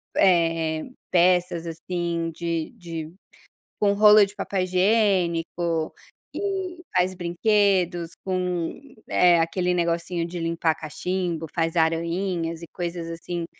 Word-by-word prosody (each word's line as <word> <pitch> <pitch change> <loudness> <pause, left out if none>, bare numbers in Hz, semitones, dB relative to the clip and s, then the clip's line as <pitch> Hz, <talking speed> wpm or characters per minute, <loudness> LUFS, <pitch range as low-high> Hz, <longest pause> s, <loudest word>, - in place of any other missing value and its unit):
eh 165 -3 +3
eh, - - -6 0.3
peças 175 -1 +3
assim 170 0 -3
de 165 -1 -3
de 165 -2 -7 0.7
com 200 -1 +3
rolo 210 +1 +7
de 200 +1 -3
papel 195 -1 -2
higiênico, 180 -4 +1 0.4
e 380 -3 -3
faz 180 +1 +2
brinquedos, 180 -1 +1
com, 180 -3 -2 0.3
eh, 175 -1 +5
aquele 180 +2 0
negocinho 170 0 -1
de 175 +1 -6
limpar 165 -1 0
cachimbo, 165 +1 -3
faz 165 0 0
arainhas 170 +1 0
e 170 - -8
coisas 170 -1 -4
assim, 170 +1 -4
175 Hz, 115 wpm, -24 LUFS, 165-185 Hz, 0.7 s, rolo